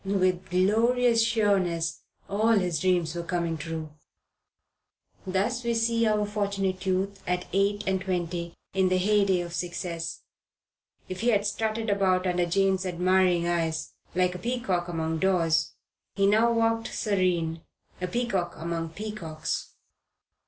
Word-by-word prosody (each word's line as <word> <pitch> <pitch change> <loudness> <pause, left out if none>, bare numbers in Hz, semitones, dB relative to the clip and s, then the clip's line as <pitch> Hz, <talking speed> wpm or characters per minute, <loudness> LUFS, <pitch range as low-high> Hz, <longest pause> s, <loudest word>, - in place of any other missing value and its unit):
With 185 -2 0
glorious 230 +5 +3
sureness 190 -8 +1 0.3
all 215 +3 +2
his 180 -6 +1
dreams 175 -4 +1
were 175 - -3
coming 170 -1 -1
true. 160 0 -5 1.4
Thus 210 +7 0
we 235 0 0
see 230 0 +2
our 210 -1 +2
Fortunate 200 -3 -2
Youth 195 +1 -1
at 180 0 -1
eight 200 +1 +1
and 190 -1 0
twenty 175 -2 -3 0.2
in 190 -1 +2
the 185 - +2
heyday 195 -1 +3
of 170 -1 -6
success. 175 -1 -4 0.9
If 185 0 -6
he 235 - 0
had 205 -4 +3
strutted 220 +2 -1
about 190 -2 +2
under 180 -1 +1
Jane's 190 +1 +2
admiring 180 -1 +2
eyes, 165 -2 -1 0.2
like 180 0 +2
a 180 - -7
peacock 190 -5 -1
among 160 -1 -2
daws, 165 -4 +2 0.4
he 195 - +2
now 220 +4 +4
walked 225 0 +1
serene, 180 -5 0 0.4
a 180 - -1
peacock 190 -5 -1
among 165 0 -3
peacocks. 195 -6 -5
185 Hz, 135 wpm, -27 LUFS, 175-210 Hz, 1.4 s, now